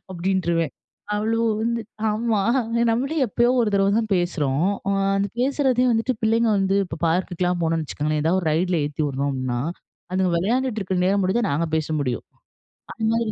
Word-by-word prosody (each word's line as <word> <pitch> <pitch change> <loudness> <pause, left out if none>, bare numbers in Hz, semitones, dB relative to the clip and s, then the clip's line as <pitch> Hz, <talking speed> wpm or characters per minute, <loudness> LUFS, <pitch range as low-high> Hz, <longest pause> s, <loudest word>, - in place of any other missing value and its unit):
அப்டின்ட்ருவேன். 170 -4 0 0.4
அவ்ளும் 225 +2 +1
வந்து 235 0 0 0.3
ஆமா 220 +1 0 0.5
நம்மளே 270 +7 -1
எப்பயோ 240 +3 +2
ஒரு 225 - +2
தடவ 195 0 +3
தான் 220 -2 -1
பேசுறோம். 160 -4 0 0.5
அந்த 195 - +1
பேசுறதையும் 255 -2 +2
வந்துட்டு 225 +3 +1
பிள்ளைங்க 225 +1 +3
வந்து 195 0 +1
இப்போ 160 -2 -7
பார்க்குக்லாம் 180 0 0
போனோம்னு 165 -1 0
வச்சுக்கோங்களேன், 150 +1 -2
எதாவது 170 +4 +2
ஒரு 170 - -6
ரைடில 175 +1 +1
ஏத்தி 150 +1 -3
விடுறோம்னா, 130 -3 -2 0.5
அதுங்க 185 -1 +1
வெளையாண்டுட்டு 230 +4 0
இருக்ற 190 -1 -2
நேரம் 200 +2 +2
மட்டும்தான் 205 +4 +1
நாங்க 165 +4 0
பேச 155 -1 -1
முடியும். 125 -5 -2 0.7
அதுமாதிரி 225 0 0
190 Hz, 150 wpm, -23 LUFS, 165-225 Hz, 0.7 s, தடவ